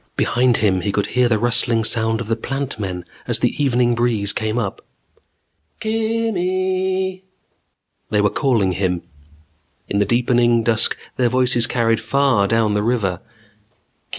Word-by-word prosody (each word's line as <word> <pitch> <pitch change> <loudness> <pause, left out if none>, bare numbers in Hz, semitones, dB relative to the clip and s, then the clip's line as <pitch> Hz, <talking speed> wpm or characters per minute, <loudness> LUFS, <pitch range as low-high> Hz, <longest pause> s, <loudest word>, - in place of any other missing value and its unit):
Behind 125 0 +2
him 95 -4 +1
he 100 - -1
could 100 0 0
hear 125 0 +3
the 110 - +2
rustling 120 0 +1
sound 110 0 0
of 115 - -6
the 115 - 0
Plant 135 +1 -4
Men 90 -3 -4 0.2
as - - +2
the - - 0
evening 120 -3 +2
breeze 115 -4 0
came 110 +1 -2
up. 105 -5 -3 1.0
"Kimm 225 +1 -1
eeeee 185 +1 -1 0.5
" - - -51
They 105 - +1
were 105 0 +2
calling 115 -9 +1
him. 90 -2 -2 0.8
In 100 - -1
the 105 - +3
deepening 120 +1 +2
dusk 115 -1 +3 0.2
their 125 -2 +2
voices 125 -2 +2
carried 115 -2 +1
far 120 -3 +2
down 115 -1 +1
the 105 - +1
river. 105 -6 -1
120 Hz, 150 wpm, -19 LUFS, 105-130 Hz, 1.0 s, hear